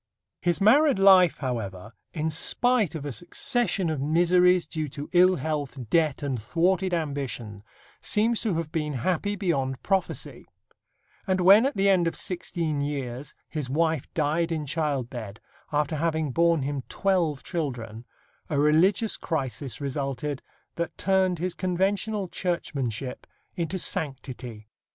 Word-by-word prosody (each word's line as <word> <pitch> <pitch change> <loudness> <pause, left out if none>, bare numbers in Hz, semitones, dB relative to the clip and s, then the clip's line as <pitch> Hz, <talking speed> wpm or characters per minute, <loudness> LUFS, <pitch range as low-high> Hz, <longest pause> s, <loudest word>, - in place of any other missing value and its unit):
His 175 -1 +1
married 270 +7 +5
life, 190 -3 +6
however, 110 -6 -4 0.2
in 160 -1 -2
spite 215 +3 +2
of 150 -2 -5
a 145 - -3
succession 190 - -1
of 150 -4 -2
miseries 175 +4 +4
due 155 -2 -4
to 145 +2 -8
ill 185 +1 +6
health, 145 -1 -3
debt 155 -4 +2
and 130 -5 -2
thwarted 185 - +1
ambition, 140 - -3 0.4
seems 225 +2 +1
to 210 -7 0
have 160 -2 -3
been 150 -3 -2
happy 185 +3 0
beyond 140 -10 -1
prophecy; 195 -1 -2 0.8
and 190 -1 +1
when 200 +7 +7
at 275 - -4
the 195 +1 +3
end 185 -3 +4
of 165 - -2
sixteen 165 -4 -2
years 140 -2 -4
his 150 -5 -4
wife 160 0 0
died 160 +2 +1
in 155 -2 -2
childbed, 130 -8 -3 0.3
after 150 +1 0
having 160 -2 0
borne 170 0 +3
him 140 0 -2
twelve 175 -8 0
children, 120 - -4 0.5
a 150 - -1
religious 170 +9 +3
crisis 135 - -3
resulted 140 0 -3 0.4
that 170 -1 -3
turned 190 -2 +2
his 180 +2 -2
conventional 195 +3 -1
churchmanship 140 - -3 0.3
into 175 +1 -2
sanctity. 125 -9 -3
160 Hz, 135 wpm, -26 LUFS, 140-185 Hz, 0.8 s, when